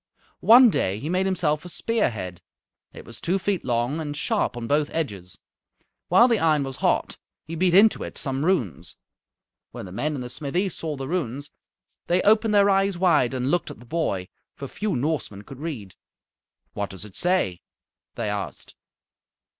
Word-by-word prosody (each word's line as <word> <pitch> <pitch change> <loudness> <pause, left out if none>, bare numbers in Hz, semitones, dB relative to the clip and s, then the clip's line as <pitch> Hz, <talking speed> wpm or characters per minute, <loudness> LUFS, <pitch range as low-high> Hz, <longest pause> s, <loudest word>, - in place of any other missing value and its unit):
One 240 +1 +8
day 95 - 0
he 145 +8 -5
made 185 +1 +1
himself 155 -5 0
a 180 - -8
spear 230 +4 +1
head. 90 -6 -7 0.5
It - - -12
was - - -8
two 180 +3 +1
feet 195 0 -1
long 120 +4 0
and 145 -1 -4
sharp 165 - 0
on 120 - -4
both 145 +4 +1
edges. 100 - -4 0.7
While 210 +8 +6
the 230 -4 +2
iron 155 -3 +3
was 135 -1 -6
hot - - 0 0.3
he 165 - -8
beat 175 +1 +2
into 215 +3 +6
it - - -8
some 135 0 -2
runes. 160 - -1 0.7
When - - -8
the 90 - -10
men 150 +10 -2
in 135 - -4
the 125 - -6
smithy 155 +9 -1
saw 160 -3 -4
the 135 0 -5
runes 145 -4 -3 0.6
they 180 +1 +2
opened 215 +1 +4
their 200 0 +6
eyes 195 -1 +2
wide 150 -9 +3
and 130 +2 -1
looked 175 - 0
at - - -9
the 120 - -15
boy, 115 - -2 0.3
for 140 - -7
few 205 +6 -3
Norsemen 125 -7 -2
could 135 +4 -11
read. 130 - -6 0.8
"What 100 -1 -3
does 95 +1 -7
it 100 - -14
say?" 175 - +1 0.5
they - - -3
asked. 105 -1 -5
150 Hz, 180 wpm, -24 LUFS, 120-185 Hz, 0.8 s, One